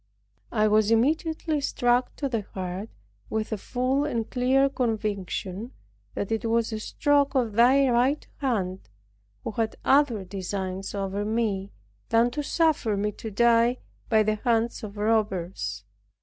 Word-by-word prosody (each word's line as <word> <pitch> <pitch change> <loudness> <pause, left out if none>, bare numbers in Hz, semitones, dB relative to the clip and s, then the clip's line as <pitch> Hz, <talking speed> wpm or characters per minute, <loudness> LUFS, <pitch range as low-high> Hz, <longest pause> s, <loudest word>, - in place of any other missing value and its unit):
I 215 -2 +3
was 215 0 +3
immediately 310 +5 +1
struck 245 -2 +1
to 280 - -2
the 230 -5 -1
heart 185 +3 -4 0.4
with 220 +1 -2
a 215 - -1
full 255 +6 0
and 230 -6 -2
clear 265 +2 +3
conviction 215 -3 -3 0.4
that 200 - -3
it 225 - 0
was 230 0 +1
a 215 - -3
stroke 285 +5 +1
of 240 -5 +1
Thy 260 +5 +5
right 255 +4 +2
hand, 195 - -2 0.5
who - - -3
had 220 +1 -1
other 265 -7 +3
designs 190 0 -4
over 200 +1 -2
me 210 -3 -1 0.4
than 230 +1 +3
to 295 - -2
suffer 295 -8 +1
me 210 +1 0
to 220 +2 -7
die 235 +3 +3 0.3
by 220 -2 +4
the 215 0 0
hand 230 0 +1
of 210 -1 -8
robbers. 190 - -1
225 Hz, 145 wpm, -26 LUFS, 205-250 Hz, 0.5 s, Thy